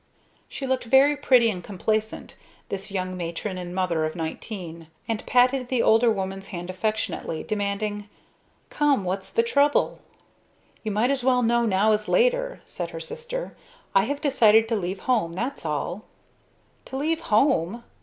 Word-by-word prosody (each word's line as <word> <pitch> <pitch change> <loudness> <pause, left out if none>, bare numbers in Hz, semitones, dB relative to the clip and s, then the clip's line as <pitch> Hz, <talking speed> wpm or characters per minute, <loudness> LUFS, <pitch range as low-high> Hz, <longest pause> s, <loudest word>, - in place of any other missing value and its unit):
She 275 - -5
looked 260 -2 -1
very 270 +5 +5
pretty 250 -5 +4
and 180 -3 -6
complacent, 215 +3 -2 0.3
this 195 -1 -4
young 185 -2 -3
matron 180 +2 -4
and 180 0 -6
mother 180 -4 0
of 155 0 -2
nineteen; 165 0 -6 0.2
and 225 -1 -2
patted 250 +1 +3
the 250 -2 +1
older 225 +2 +5
woman's 195 -2 -3
hand 175 0 -6
affectionately, 200 -4 -2
demanding, 205 0 -3 0.6
"Come 290 -7 +2
what's 190 +1 -3
the 230 - +2
trouble?" 285 +5 +2 0.8
"You 220 - -3
might 215 +5 +1
as 275 -3 -1
well 250 -1 +3
know 235 0 +2
now 205 +2 +3
as 210 0 0
later," - - +1
said - - -5
her - - -7
sister. 485 +1 -5 0.4
"I 195 +1 +4
have 285 +3 -3
decided 225 -7 +5
to 230 - +1
leave 185 -1 -3
home, 220 -10 +1
that's 235 -1 -4
all." 175 +7 -3 0.8
"To 265 - -6
leave 315 +4 0
home!" 230 - +1
220 Hz, 155 wpm, -25 LUFS, 190-260 Hz, 0.8 s, very